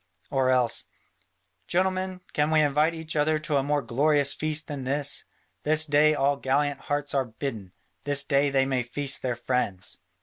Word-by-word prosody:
Or 135 -2 +1
else, 125 -2 +1 0.8
"Gentlemen, 185 0 -1
can 150 +1 +1
we 155 -1 +4
invite 150 +3 +2
each 160 0 -6
other 155 +1 +2
to 155 -1 -1
a - - +2
more 145 0 0
glorious 140 +4 +2
feast 155 0 -2
than 145 -3 -6
this? 140 +2 +1 0.4
This 155 +1 +4
day 150 +1 +3
all 140 0 +1
gallant 140 +1 0
hearts 145 0 -3
are 135 -2 +1
bidden; 110 -5 -6 0.3
this 145 0 +3
day 140 0 +2
they 135 -1 +2
may 130 -2 0
feast 135 +3 -1
their 125 -2 -2
friends." 120 -6 0
145 Hz, 170 wpm, -26 LUFS, 135-150 Hz, 0.8 s, we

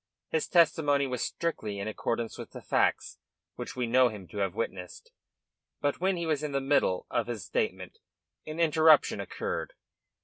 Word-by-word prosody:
His 470 -1 0
testimony 150 -4 +3
was 125 -3 -2
strictly 110 -12 -3
in 100 +1 -4
accordance 115 +1 -2
with - - -9
the - - -8
facts - - +1 0.3
which - - -7
we 125 -1 -1
know 125 +2 +4
him 100 -5 -9
to 105 - -6
have 95 -3 -1
witnessed, 90 -5 -5 0.7
but 145 0 -1
when 190 0 +2
he 170 - -2
was 155 -3 0
in 150 -2 -3
the 140 - +2
middle 135 -9 +1
of - - 0
his - - -5
statement - - -3 0.5
an 155 +2 -6
interruption 160 -7 +5
occurred. 100 - -4
140 Hz, 170 wpm, -29 LUFS, 110-160 Hz, 0.7 s, interruption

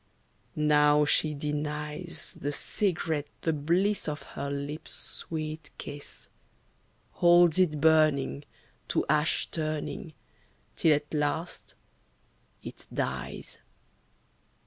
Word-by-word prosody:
Now 150 -1 +4
she 150 +1 +2
denies 150 +3 -3
The 145 - -1
cigarette 160 -3 0
the 160 - +1
bliss 175 +8 +1
of 150 0 -3
her 140 - -3
lips' 145 +3 -4
sweet 155 -1 -4
kiss, 145 0 -7 0.8
Holds 175 -1 +5
it 155 -5 +3
burning, 155 -3 +3 0.4
to - - +1
ash 150 +2 +2
turning, 155 +2 -3 0.6
Till 155 -2 +5
at 145 +1 -5
last 150 +3 -2 0.9
it - - -9
dies. - - -4
150 Hz, 95 wpm, -29 LUFS, 150-160 Hz, 0.9 s, Holds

